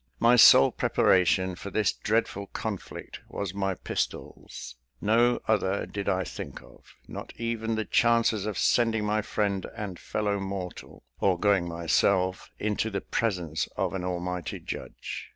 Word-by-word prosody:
My 120 +1 +6
sole 110 - +8
preparation 95 0 +2
for 95 +3 -7
this 105 -1 +1
dreadful 105 -2 -1
conflict 105 -2 -6
was 100 -3 -4
my 95 -1 -1
pistols; - - -5 0.2
no 120 +3 +3
other 95 +2 +1
did 100 -1 -4
I 95 -1 +1
think - - -7
of, - - -19
not - - -8
even 115 -1 -2
the 110 0 -2
chances 115 -3 +2
of 105 - -3
sending 115 -3 +2
my 105 +1 +1
friend 100 -2 -1
and 100 -4 -5
fellow 105 -1 -1
mortal, 95 -2 -6 0.2
or 95 -3 +2
going 100 -3 +3
myself 90 +3 +1
into 105 +1 -1
the 100 -2 -3
presence 90 -8 -1
of - - 0
an 95 -2 -3
Almighty 90 -1 -3
judge. - - -7
100 Hz, 145 wpm, -27 LUFS, 95-110 Hz, 0.2 s, sole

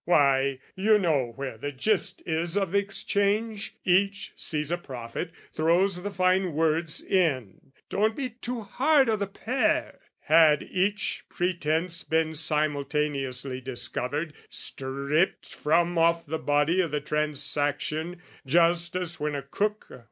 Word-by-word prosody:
Why, 140 -5 +3 0.2
you 210 +3 +4
know 150 - +1
where 135 -5 -6
the 145 +4 -3
gist 185 +10 0
is 165 +3 0
of 195 -4 0
the 200 - +4
exchange: 205 +2 -1
Each 195 +2 +2
sees 150 -1 -2
a 175 - +1
profit, 120 -4 -6 0.2
throws 180 +3 +2
the 205 - -3
fine 185 -2 +1
words 160 +1 0
in. 135 - 0 0.2
Don't 215 +2 +1
be 265 -3 -3
too 240 +1 -5
hard 270 +5 +3
o' 220 - +3
the 200 -1 -2
pair! 220 +3 -1 0.2
Had 155 -2 +5
each 200 +3 -1
pretence 170 -1 -1
Been 160 0 0
simultaneously 145 -4 -1
discovered, 135 +4 -2 0.2
stripped 140 +6 -1
From 170 +3 +1
off 165 0 +3
the 160 +2 -3
body 150 +5 +2
o' 175 - 0
the 150 -1 -2
transaction, 150 +2 -1 0.2
just 170 +4 +2
As 180 -2 -3
when 150 0 -1
a 140 - -4
cook... 210 +1 -2
165 Hz, 135 wpm, -27 LUFS, 145-195 Hz, 0.2 s, Had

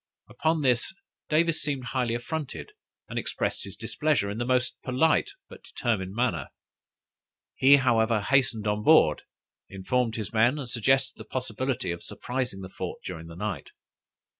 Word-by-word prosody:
Upon 160 -1 0
this, 125 +7 +1 0.3
Davis 165 +1 +2
seemed 140 -3 -2
highly 125 -1 -1
affronted, 150 - -5 0.4
and - - -3
expressed - - -2
his - - -8
displeasure 150 -10 0
in 105 - -5
the 120 - -1
most 125 0 0
polite 160 - +2 0.2
but - - -13
determined 100 -6 -2
manner. 120 -9 0 1.1
He, 135 +2 +7
however, 115 -4 +3
hastened 125 -2 +2
on 105 0 0
board, 105 - +5 0.5
informed 110 +5 -1
his 110 -2 -5
men, 120 +6 +4
and 140 -4 -5
suggested 125 +3 +1
the 110 - -8
possibility 130 -2 -2
of 85 - -5
surprising 125 -1 -4
the 95 - -7
fort - - -6
during 80 -3 -6
the 85 - -10
night. 105 +1 -4
125 Hz, 150 wpm, -27 LUFS, 105-135 Hz, 1.1 s, He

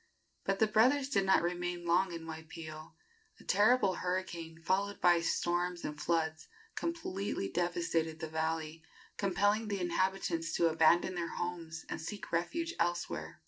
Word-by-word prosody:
But 195 - +1
the 220 - +4
brothers 255 +6 +3
did 195 -8 +2
not 190 - +5
remain 175 0 -2
long 180 +2 +3
in 165 -1 -6
Waipio. 160 -1 -8 0.4
A - - -15
terrible 210 -2 +4
hurricane, 175 -3 -3
followed 195 +4 0
by 175 -1 +5
storms 175 +1 0
and 150 0 -5
floods, 160 -1 0 0.3
completely 205 - -3
devastated 165 -2 0
the 160 - -4
valley, 160 0 -2 0.4
compelling 205 +3 +2
the 200 -1 -2
inhabitants 175 -2 0
to 170 - +3
abandon 165 +3 +4
their 170 -2 -3
homes 165 -2 -4
and - - -4
seek 200 +5 -6
refuge 330 - -1
elsewhere. 125 - -2
175 Hz, 145 wpm, -33 LUFS, 165-195 Hz, 0.4 s, not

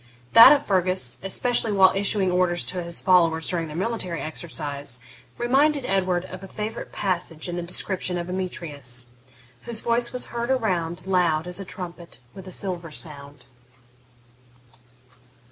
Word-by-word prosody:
That 230 +4 +11
of 290 -1 +3
Fergus, 185 -1 0
especially 225 +4 +1
while 190 -2 +6
issuing 195 -1 +1
orders 180 -1 +1
to 180 -1 -3
his 170 -1 -3
followers 165 -3 +3
during 170 -3 -2
their 155 +1 -7
military 185 -4 -2
exercise, 145 -5 -4 0.4
reminded 275 +3 +2
Edward 185 -3 0
of 185 0 -9
a - - -7
favourite 215 +3 -5
passage 175 -4 -2
in 175 - -4
the 175 - -2
description 180 +1 -1
of 175 0 -4
Emetrius: 150 -9 -2 0.6
whose 230 -2 -3
voice 235 0 +2
was 250 - -3
heard 235 +1 -2
around, 180 -10 0
Loud 175 -4 +2
as 180 +1 -3
a 195 - -6
trumpet 175 -4 -8 0.2
with 190 -1 -11
a - - -7
silver 180 -3 -3
sound. 145 -3 -9
180 Hz, 145 wpm, -24 LUFS, 170-200 Hz, 0.6 s, That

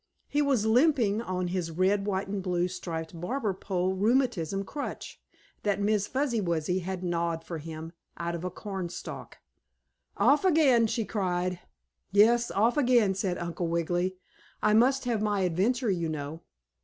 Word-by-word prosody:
He 295 - +1
was 270 -7 +2
limping 235 -3 +3
on 185 -4 -2
his 180 -2 -2
red, 190 +4 +1
white 195 -1 -1
and 195 0 -3
blue 180 -1 0
striped 165 -2 -6
barber 220 +1 -1
pole 185 -1 -1
rheumatism 200 - +1
crutch, 285 +8 -6 0.4
that 205 -1 0
Miss 205 0 +1
Fuzzy 260 -4 0
Wuzzy 170 0 0
had 185 0 -5
gnawed 170 -2 -1
for 165 -2 -6
him 160 +1 -7 0.3
out 170 0 -3
of 170 0 -5
a 180 - -1
cornstalk. 190 -2 -6 0.8
"Off 295 +5 +4
again!" 290 -10 +4
she 225 0 -1
cried. 180 -3 -1 0.5
"Yes, 230 +4 +5
off 225 +7 +2
again," 240 -7 +4
said 190 -2 -1
Uncle 170 0 -3
Wiggily. 175 +2 0 0.5
"I 215 - +4
must 260 +4 +4
have 235 -4 0
my 210 -2 +1
adventure, 200 +7 +1
you 170 -3 -1
know." 155 +1 -5
190 Hz, 155 wpm, -28 LUFS, 175-230 Hz, 0.8 s, Yes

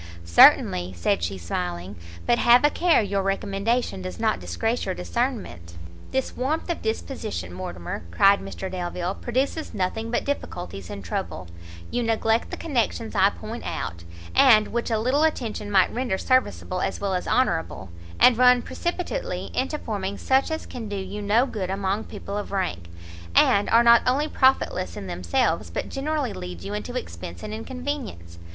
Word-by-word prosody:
"Certainly;" 90 +1 +6
said 85 +2 +1
she, 85 +3 -2
smiling; 90 +2 -4 0.3
"but 240 - +3
have 245 +4 +6
a 295 - +4
care 340 -8 +3
your 200 -1 -1
recommendation 195 +2 -1
does 185 +3 -6
not 220 -1 +1
disgrace 225 +2 -2
your - - -2
discernment." 85 -1 -3 0.3
"This 265 0 -2
warmth 305 +7 -1
of 340 - -4
disposition, 100 - -4
Mortimer," 85 -3 -5
cried 195 - +5
Mr 195 -1 -6
Delvile, 180 0 -3
"produces 260 +6 -2
nothing 210 +4 -2
but 240 - -1
difficulties 175 - -5
and 100 - -7
trouble: 85 +1 -4 0.4
you 245 - 0
neglect 225 0 +1
the - - -5
connections 235 - -1
I 195 -1 +5
point 220 +3 -8
out, 85 -1 -4 0.3
and 220 -6 +6
which 235 +1 -2
a 225 - +1
little 255 +7 +1
attention 235 -9 -1
might 190 -3 +3
render 245 -5 -1
serviceable 255 -7 0
as - - -2
well 200 -1 -1
as 180 - -2
honourable, 160 - 0 0.3
and 250 - +7
run 250 -1 +6
precipitately 360 +8 -3
into 270 +4 -1
forming 200 -6 -4
such 265 +1 +2
as 315 0 -3
can 230 -4 -7
do 205 - -3
you 195 +2 -5
no 215 +5 +3
good 195 -8 -4
among 195 +2 -1
people 200 - -7
of 205 - -7
rank, 90 - -2 0.5
and 200 0 +5
are 230 +1 +6
not 235 0 +7
only 280 +4 +2
profitless 260 - +1
in - - -6
themselves, 85 -1 0
but 85 - -4
generally 280 -4 -2
lead 90 - -7
you 100 +1 -5
into 105 -3 -4
expence 85 0 -7
and 210 - -5
inconvenience. 230 - -6
205 Hz, 165 wpm, -24 LUFS, -, 0.5 s, and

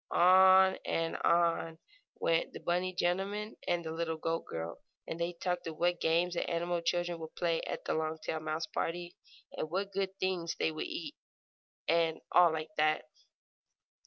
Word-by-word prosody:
On 190 +1 +6
and 165 0 -1
on 170 -1 +2 0.4
went 165 0 +1
the - - -9
rabbit 180 +1 0
gentleman 195 +5 -1
and 175 -1 0
the 160 - -3
little 160 0 -2
goat 165 +1 -2
girl, 80 +1 -5 0.2
and 165 - -5
they 170 +1 0
talked 180 0 -3
of 160 -1 -6
what 175 0 +1
games 170 +2 +2
the 175 - -2
animal 175 0 -1
children 175 0 -1
would 160 0 -8
play 170 -2 0
at - - -5
the - - 0
Longtail 160 0 -2
mouse 155 +1 -2
party, 175 +1 -3 0.4
and 155 - -3
what 195 +4 -2
good 195 -1 -2
things 180 -3 -1
they - - 0
would 155 - -4
eat, 325 -3 -5 0.7
and 165 -1 +2
all 175 -2 +6
like 155 0 -3
that. 155 0 +2
170 Hz, 165 wpm, -32 LUFS, 160-180 Hz, 0.7 s, On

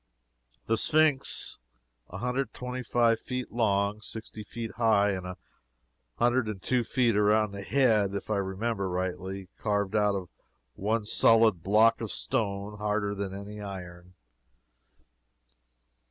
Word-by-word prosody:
The 115 - +1
Sphynx: 155 -3 +1 0.5
a 90 - -7
hundred 125 +5 -1
and - - -40
twenty 125 0 -5
five 115 -1 +2
feet 125 +1 -5
long, 105 -2 +1
sixty 110 0 -7
feet 115 +2 -6
high, 110 -3 +3
and 95 -2 -4
a 90 - -7 0.8
hundred 120 0 +2
and 105 -3 -5
two 125 +5 0
feet 120 -1 +1
around 105 0 +3
the 100 0 -7
head, 105 -4 +2
if 100 - -4
I 105 - +2
remember 100 +1 -2
rightly 95 +1 -4
carved 100 -1 -1
out 105 -1 +3
of 90 -3 -5 0.4
one 110 +2 -1
solid 110 -4 +5
block 110 +5 +4
of - - -3
stone 100 - -2
harder 105 -1 -1
than 100 -1 -4
any 100 +2 -8
iron. 90 -2 -9
105 Hz, 140 wpm, -28 LUFS, 100-115 Hz, 0.8 s, solid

